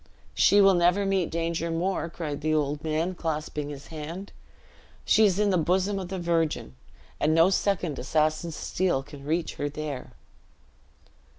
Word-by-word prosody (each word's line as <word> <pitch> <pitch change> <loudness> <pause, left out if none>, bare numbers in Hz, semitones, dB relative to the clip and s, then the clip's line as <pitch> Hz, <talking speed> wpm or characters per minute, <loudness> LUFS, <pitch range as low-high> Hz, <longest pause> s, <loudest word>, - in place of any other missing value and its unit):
"She 205 - +5
will 195 -1 +6
never 180 +3 +3
meet 195 -3 +1
danger 165 0 -2
more!" 170 +1 -1
cried 150 -4 -5
the 155 +1 +1
old 145 0 -1
man, 160 +3 -1
clasping 150 -3 -3
his 140 -1 -9
hand; 165 +6 -6 0.7
"she 220 - +5
is 195 -3 +2
in 205 -1 +2
the 180 - +2
bosom 190 +4 +1
of 185 - -5
the 190 +1 -4
Virgin; 165 - -1 0.5
and 155 +2 +2
no 165 +3 +5
second 180 -7 0
assassin's 155 +4 0
steel 175 -7 -1
can 145 0 -12
reach 160 +3 -2
her 145 - -2
there." 145 -3 -6
165 Hz, 160 wpm, -27 LUFS, 150-185 Hz, 0.7 s, will